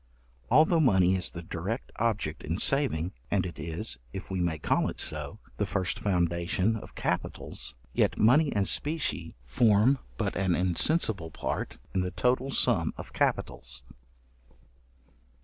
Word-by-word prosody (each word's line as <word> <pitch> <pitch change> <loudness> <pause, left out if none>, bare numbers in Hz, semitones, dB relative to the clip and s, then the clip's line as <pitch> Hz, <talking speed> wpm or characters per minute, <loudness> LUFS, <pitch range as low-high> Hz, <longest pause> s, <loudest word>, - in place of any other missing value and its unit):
Although 160 +2 +5
money 95 - +4
is 90 - 0
the 85 - -7
direct 90 +9 -4
object 105 -9 -1
in 80 +3 -2
saving, 105 - +1 0.2
and 95 -3 +1
it 85 -5 -7
is, 80 - -1
if 95 0 -7
we 95 -1 -1
may 85 -2 0
call - - +1
it - - -7
so, - - -3 0.2
the - - +1
first 95 -2 -1
foundation 90 +2 +1
of 110 - -9
capitals, - - -3 0.2
yet - - +2
money 140 +7 +5
and 100 -2 +1
specie 145 - -1
form 110 - +4 0.2
but 105 -3 -1
an 95 -3 +1
insensible 95 - +1
part - - -4 0.2
in 95 - +1
the 90 - -1
total 125 +6 +1
sum - - +1
of - - -9
capitals. 65 0 -1
95 Hz, 145 wpm, -29 LUFS, 85-115 Hz, 0.2 s, Although